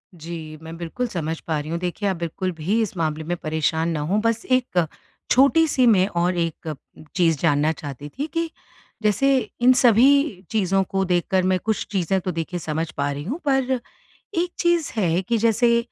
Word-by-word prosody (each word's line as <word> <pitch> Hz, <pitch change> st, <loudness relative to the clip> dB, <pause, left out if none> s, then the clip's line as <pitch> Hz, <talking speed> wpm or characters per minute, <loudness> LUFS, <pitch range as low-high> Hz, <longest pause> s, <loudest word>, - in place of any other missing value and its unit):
जी, 160 Hz, -1 st, -8 dB
मैं 165 Hz, +1 st, -8 dB
बिल्कुल 175 Hz, +9 st, -3 dB
समझ 165 Hz, -6 st, -3 dB
पा 160 Hz, -2 st, 0 dB
रही 150 Hz, +1 st, -6 dB
हूँ। 170 Hz, -, -1 dB
देखिए, 180 Hz, +3 st, -2 dB
आप 190 Hz, -, 0 dB
बिल्कुल 170 Hz, +3 st, -3 dB
भी 200 Hz, +9 st, +1 dB
इस 215 Hz, -, -2 dB
मामले 160 Hz, -1 st, -1 dB
में 175 Hz, +3 st, -2 dB
परेशान 160 Hz, +1 st, 0 dB
ना 165 Hz, -2 st, -1 dB
हों 175 Hz, +8 st, 0 dB
बस 230 Hz, 0 st, 0 dB
एक 245 Hz, -9 st, +2 dB, 0.5 s
छोटी-सी 280 Hz, 0 st, +4 dB
मैं 195 Hz, -4 st, +5 dB
और 175 Hz, -1 st, 0 dB
एक 165 Hz, -2 st, -2 dB, 0.4 s
चीज़ 165 Hz, -4 st, +3 dB
जानना 150 Hz, 0 st, +2 dB
चाहती 145 Hz, -2 st, -7 dB
थी 280 Hz, -, -4 dB
कि, 330 Hz, 0 st, -1 dB, 0.5 s
जैसे 265 Hz, +7 st, +3 dB, 0.2 s
इन 250 Hz, +1 st, +7 dB
सभी 250 Hz, -, +4 dB
चीज़ों 195 Hz, -3 st, +2 dB
को 195 Hz, +1 st, -1 dB
देखकर 180 Hz, +1 st, +1 dB
मैं 185 Hz, 0 st, +2 dB
कुछ 220 Hz, -1 st, 0 dB
चीज़ें 190 Hz, -1 st, +1 dB
तो 185 Hz, -, -2 dB
देखिए 165 Hz, +1 st, -4 dB
समझ 160 Hz, 0 st, -3 dB
पा 140 Hz, 0 st, 0 dB
रही 140 Hz, +1 st, -5 dB
हूँ, 255 Hz, -, -4 dB
पर 270 Hz, -2 st, +2 dB, 0.6 s
एक 345 Hz, +1 st, 0 dB
चीज़ 345 Hz, -3 st, +1 dB
है 180 Hz, -4 st, +1 dB
कि 230 Hz, +5 st, 0 dB
जैसे 230 Hz, +2 st, +3 dB
185 Hz, 185 wpm, -23 LUFS, 160-230 Hz, 0.6 s, इन